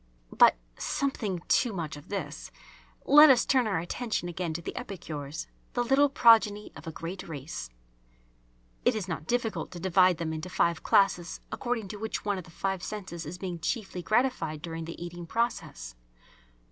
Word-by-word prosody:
But, - - +7 0.2
"something 210 -10 -2
too 240 -4 +3
much 165 -6 -4
of 145 - -13
this." 155 -8 -5 0.6
Let 295 +2 +9
us 250 -3 +5
turn 255 -4 +3
our 195 - 0
attention 175 +3 -2
again 175 -1 -3
to 170 - -3
the - - -5
epicures, 160 - -6 0.3
the 245 - +1
little 270 +4 +4
progeny 220 -5 +5
of - - -11
a - - -3
great 170 +4 -6
race. 145 - -6 1.1
It - - +3
is 205 -4 -3
not 160 -3 -5
difficult 225 -9 -1
to 175 - -7
divide 185 0 +4
them 160 -1 -3
into 160 +3 -5
five 170 -2 +1
classes 175 -4 +2
according 240 -4 -2
to 210 - -6
which 220 +1 -4
one 200 -2 0
of 180 - -9
the - - -15
five 190 +2 -2
senses 185 -6 -6
is 175 +4 -6
being 180 -2 -5
chiefly 195 0 -3
gratified 215 - 0
during 165 -1 -5
the 165 - -8
eating 175 0 -7
process. 225 - -2
185 Hz, 170 wpm, -29 LUFS, 165-220 Hz, 1.1 s, Let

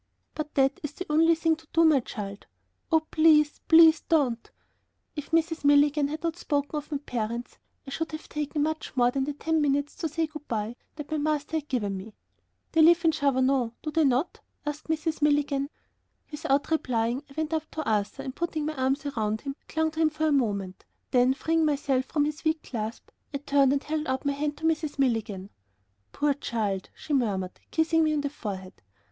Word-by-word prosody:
"But 305 -1 -5
that 270 0 +2
is 295 -1 -5
the 365 - -6
only 325 +2 +5
thing 325 0 +2
to 320 0 -19
do, 330 0 +5
my 310 -4 +6
child." 200 -4 -7 0.4
"Oh, 320 -1 +5
please, 310 -2 +4
please 325 -1 +7
don't." 270 -8 0 0.7
If 295 -2 -6
Mrs. 325 -1 +1
Milligan 290 0 +4
had 310 +3 -6
not 335 -1 -1
spoken 290 -3 -1
of 300 +1 -5
my 290 - 0
parents, 235 -3 -4 0.3
I 270 - -8
should 325 +3 -3
have 310 - -7
taken 295 0 -2
much 315 -3 -3
more 245 0 +4
than 270 +1 -1
the 295 - -3
ten 320 +2 0
minutes 285 0 +1
to 325 - -2
say 325 +2 0
good 305 -1 -10
by 220 0 -2 0.2
that 295 -1 -8
my 310 - 0
master 305 +1 -1
had 300 -2 -5
given 210 -8 -1
me. 205 +3 -10 0.6
"They 325 - +4
live 335 +1 +6
in 325 - +6
Chavanon, 260 -4 +1
do 305 - -3
they 320 +1 +3
not?" 270 +4 +1 0.3
asked 295 0 -4
Mrs. 315 0 -1
Milligan. 290 -1 +2 0.6
Without 295 -1 0
replying, 245 -4 0
I - - -14
went 315 0 -1
up 315 -1 -2
to 315 -1 -5
Arthur 210 -2 -1
and, 260 0 -6
putting 320 -3 -2
my 310 - -2
arms 270 +2 0
round 215 -1 -1
him, 275 -1 -5
clung 320 0 0
to 320 - -7
him 315 - +4
for 310 +1 -2
a 310 - +3
moment 200 -9 -1 0.3
then, 250 +1 +4
freeing 325 +3 +1
myself 280 -3 +1
from 290 +1 0
his 300 0 -4
weak 315 0 0
clasp, 225 -2 -5 0.3
I - - +2
turned 280 -1 +3
and 280 0 0
held 305 +1 -2
out 260 +1 -2
my 280 - +2
hand 295 +1 -2
to 320 - -5
Mrs. 315 -2 0
Milligan. 220 -7 -1 0.6
"Poor 290 0 +1
child," 215 -8 -3
she 300 - -5
murmured, 200 -8 0
kissing 325 0 +2
me 310 -1 +2
on 295 - 0
the 285 -1 -3
forehead. 190 -8 -7
290 Hz, 200 wpm, -27 LUFS, 260-315 Hz, 0.7 s, please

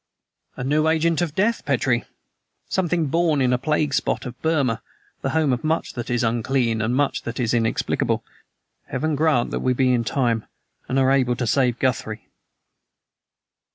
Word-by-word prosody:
"A - - -5
new 150 +4 +2
agent 165 0 +2
of 160 -4 -2
death, 225 +4 +1
Petrie! - - +1 0.6
Something 175 -3 0
born 160 0 +1
in 125 -1 +2
a 125 - +1
plague 150 +1 0
spot - - 0
of 125 0 -8
Burma 140 -8 +1 0.4
the - - -1
home 155 -4 +2
of 120 - -3
much 160 +1 -1
that 120 -2 -5
is 120 -1 +1
unclean 115 0 0
and 115 +3 0
much 145 +1 +1
that 120 +1 -6
is 120 -2 0
inexplicable. 115 -2 0 0.6
Heaven 155 +4 -1
grant 150 -5 +2
that - - -2
we 130 - +1
be 130 0 +2
in 120 -1 +1
time, 115 -2 0 0.4
and 130 - 0
are 135 0 +4
able 130 -3 +2
to 120 - -2
save 125 0 +2
Guthrie." 115 -4 -2
130 Hz, 170 wpm, -23 LUFS, 120-155 Hz, 0.6 s, are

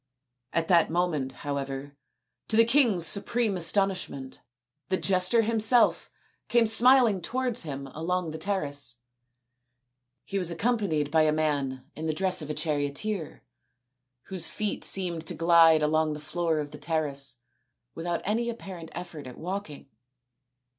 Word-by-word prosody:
At 165 -1 -1
that 170 -3 +4
moment, 160 -6 -1
however, 140 0 -5 0.5
to 220 - 0
the 230 - +7
king's 235 - +4
supreme 215 +3 +2
astonishment, 185 -7 0 0.5
the 185 - +1
jester 185 +5 +2
himself 225 +2 +3 0.4
came 240 -1 +4
smil 245 +3 +5
ing 195 -4 -1
towards 250 +4 -1
him 140 -4 -6
along 170 +1 -2
the 160 - -7
terrace. 145 -9 -2 1.3
He 195 - -2
was 180 -3 +1
accom 230 +8 0
panied 155 -8 -1
by 160 0 +4
a 155 0 +3
man 145 -4 -1
in 160 +1 -4
the 155 - -1
dress 185 0 +1
of 150 - -7
a 150 - -3
charioteer, 155 +5 -3 0.8
whose 180 -4 +1
feet 210 -1 -3
seemed 170 -4 -1
to - - -4
glide 165 -2 +5
along 155 0 +1
the 150 - -6
floor 165 +1 -1
of 145 -1 -4
the 150 - -10
terrace 140 -5 -2 0.6
without 170 +3 -3
any 230 +4 -1
apparent 185 -8 -8
effort 155 -6 -8
at 125 - -10
walking. 180 -4 -6
170 Hz, 145 wpm, -27 LUFS, 150-200 Hz, 1.3 s, the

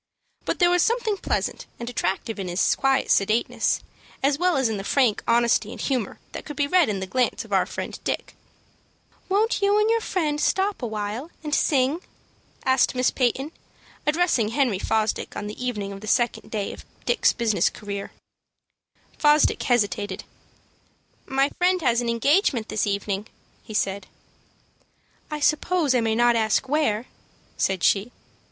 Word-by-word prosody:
But - - -1
there 350 -1 +4
was 355 0 +3
something 460 -1 +1
pleasant - - -2
and 235 - -6
attractive 220 -1 -2
in 190 - -3
his 175 +2 +2
quiet 270 0 +1
sedateness, 215 +4 +1 0.4
as 280 +1 +2
well 360 -3 +2
as 265 -2 +2
in 220 -2 -2
the 195 - -5
frank 245 -1 +2
honesty 235 -1 +2
and - - -9
humor 250 -7 -2
that - - -7
could 295 - -8
be 285 - +1
read 345 -2 +3
in 200 -2 -1
the - - -2
glance 250 +6 0
of - - -8
our - - +3
friend - - -6
Dick. - - -3 1.0
"Won't 420 +3 +1
you 405 +1 +3
and 430 +1 +3
your 460 0 +2
friend 305 -8 -1
stop 385 -1 +1
a - - -2
little - - -3
while 215 +7 -4
and 300 -1 -4
sing?" 280 +2 +2 0.7
asked 260 -1 +3
Miss 250 0 +2
Peyton, 265 +4 0 0.6
addressing 305 -8 +2
Henry 230 -4 +1
Fosdick 220 +1 -1
on - - -4
the 210 +4 -6
evening 210 -5 -3
of 195 - -9
the 215 - -9
second 240 +2 0
day 205 -3 -3
of - - -11 0.2
Dick's 485 - +3
business 230 -3 +1
career. 200 -1 -6 1.1
Fosdick 300 0 +4
hesitated. 205 -4 0 1.0
"My 270 +1 +2
friend 365 +1 +3
has 240 -2 +3
an 240 - -2
engagement 240 - +2
this 215 - 0
evening," 200 +1 -2 0.3
he 215 - -9
said. 195 -1 -1 1.2
"I 300 -1 -4
suppose 305 0 +2
I 250 - +3
may 225 -1 +1
not 240 0 +4
ask 220 +3 +1
where," 260 -6 +1 0.5
said 190 -2 0
she. 205 +4 +2
245 Hz, 165 wpm, -24 LUFS, 215-300 Hz, 1.2 s, there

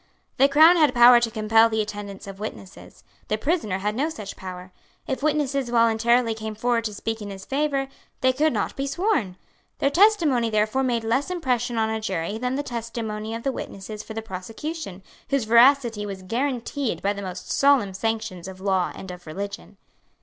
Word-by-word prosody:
The 275 +2 +5
Crown 315 +5 +7
had 300 -6 +3
power 240 0 +8
to 235 -1 0
compel 225 +1 +4
the 220 0 -1
attendance 205 -1 -5
of 195 -1 -9
witnesses. 200 -2 -9 0.2
The 215 - 0
prisoner 245 - -1
had 205 +2 -2
no 280 +8 0
such 210 -10 -7
power. 185 0 -9 0.3
If 265 - -3
witnesses 285 -3 0
voluntarily 230 0 +3
came 220 -1 -6
forward 230 +1 0
to 215 - -3
speak 225 +1 -4
in 205 - -6
his 195 -1 -9
favour, 275 -1 0 0.3
they 260 0 +3
could 305 +4 +2
not - - -2
be 275 +1 -2
sworn. 275 - 0 0.4
Their 275 - +1
testimony 325 - +4
therefore 215 +4 +1
made 240 -3 0
less 255 +7 0
impression 250 -9 -1
on 220 0 +1
a 220 0 -2
jury 195 0 -3
than 250 +1 -1
the 285 - -2
testimony 225 -3 -5
of 230 - -6
the 275 - 0
witnesses 210 -3 -7
for 220 - -9
the 225 - -4
prosecution, 220 - -6 0.3
whose 275 -3 +1
veracity 235 -1 +4
was 195 -2 -7
guaranteed 250 +4 -2
by 200 +1 +1
the 200 - -7
most 185 -1 -6
solemn 275 -9 +3
sanctions 210 -4 -3
of 190 -1 -9
law 190 -2 0
and 190 - -8
of 180 -1 -11
religion. 200 +4 -7
225 Hz, 185 wpm, -24 LUFS, 205-270 Hz, 0.4 s, power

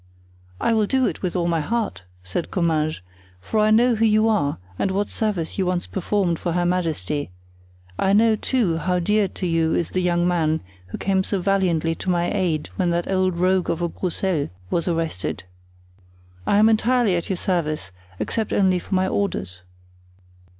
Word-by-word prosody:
"I 230 - +2
will 215 -2 +2
do 260 +2 +2
it - - -2
with 180 -1 -2
all 175 -1 +1
my 165 -1 +1
heart," 210 - -2 0.2
said 90 - -3
Comminges; 155 - 0 0.4
"for 155 - -2
I 215 0 +4
know 235 +3 +5
who 225 0 0
you 215 0 +4
are 200 -10 +1 0.2
and - - +1
what 200 +2 -1
service 200 -6 -2
you 190 - +1
once 180 -1 0
performed 190 -3 -1
for 175 - -2
her 175 0 +1
majesty; 160 - -1 0.7
I 195 - +2
know, 220 +1 +5
too, 210 -7 0
how 180 +3 0
dear 210 +3 +2
to 185 - -6
you 165 -2 +1
is 170 - -1
the 185 - 0
young 175 -1 +1
man 160 -3 +1 0.3
who - - -6
came 190 -1 +1
so 195 0 -1
valiantly 175 -4 +1
to 185 - -5
my 175 -1 +1
aid 170 -6 -1
when 180 -2 +1
that 170 +2 -1
old 185 -2 +1
rogue 185 +1 +2
of 170 - -1
a 170 - 0
Broussel 180 -3 -1 0.2
was 170 0 0
arrested. 165 - -2 1.0
I 200 - +3
am 215 +1 +6
entirely 225 -2 +3
at 170 - -3
your 190 - -1
service, 155 - -1 0.3
except 220 - -2
only 185 -2 +3
for 190 - -3
my 185 0 +2
orders." 95 - -2
180 Hz, 185 wpm, -22 LUFS, 165-200 Hz, 1.0 s, am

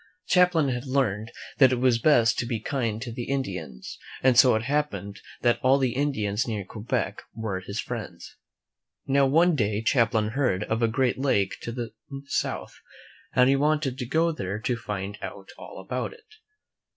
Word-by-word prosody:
Champlain 180 -5 +3
had 125 +1 -3
learned 115 -5 0 0.3
that 135 -3 +7
it - - +2
was 125 -1 +2
best 115 -4 +4
to 120 - -2
be 115 -3 -2
kind 115 -2 -2
to 120 - -6
the 120 +1 -5
Indians, 95 - -4 0.2
and 130 -1 +5
so 125 -1 +7
it 110 - -1
happened 135 -8 -2 0.2
that 120 -1 +2
all 130 +1 +4
the 130 -3 0
Indians 120 -7 -1
near 105 -4 -3
Quebec 105 +4 -3
were 110 -4 -3
his 100 +3 -6
friends. 90 -10 -6 0.7
Now, 140 0 +3
one 165 +5 +4
day 105 -4 0
Champlain 115 -4 +2
heard 110 -6 0
of 110 +2 -2
a 115 - +4
great 125 +3 0
lake 105 -8 +1
to 120 - -5
the 120 -1 -5 0.3
south, 140 - -3 0.6
and 125 0 +5
he 135 - +4
wanted 145 -2 0
to 125 - -3
go 165 +5 +2
there 100 - -4
to 125 - 0
find 105 -3 -5
out - - -8
all - - -10
about - - -4
it. 445 -1 -20
120 Hz, 175 wpm, -26 LUFS, 105-135 Hz, 0.7 s, that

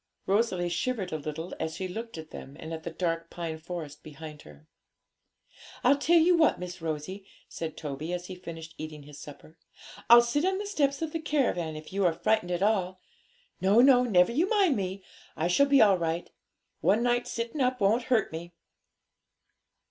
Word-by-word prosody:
Rosalie 195 -3 +1
shivered 190 +2 -2
a 155 - -1
little 155 +3 -6
as 160 0 -3
she 190 - -4
looked 225 +2 -7
at 160 -1 -9
them 140 +2 -10
and 160 +1 -7
at 160 - -5
the 170 - -5
dark 165 0 -2
pine 165 -2 -5
forest 160 -3 -7
behind 155 0 -10
her. 75 0 -16 1.2
'I'll 275 +3 +4
tell 340 +4 +4
you 345 +2 +5
what, 325 -2 +4
Miss 180 -1 -7
Rosie,' 160 +5 -4 0.2
said 160 -2 -6
Toby, 150 +2 -5
as 180 0 -3
he 185 - -7
finished 165 -3 -9
eating 155 -1 -7
his 145 0 -12
supper, 150 +2 -12 0.5
'I'll 235 0 +9
sit 240 +6 0
on 380 +1 +1
the 410 - -4
steps 290 -7 0
of 320 - -3
the 325 - -3
caravan, 245 - 0
if 155 +3 -10
you 200 0 0
are 175 -2 +3
frightened 180 +2 0
at 180 +1 -1
all. 190 -3 +1 0.6
No, 195 +4 +4
no; 255 0 +7
never 185 -5 +4
you 325 +10 +1
mind 390 - +3
me; 190 -1 -4 0.3
I 160 - 0
shall 280 +11 +4
be 275 -4 +6
all 195 -4 +4
right. 165 +1 -2 0.5
One 215 +4 +2
night's 245 0 +1
sitting 235 +5 -3
up 255 0 +1
won't 220 +5 +2
hurt 235 -5 +1
me.' 170 +2 -7
180 Hz, 190 wpm, -28 LUFS, 160-240 Hz, 1.2 s, I'll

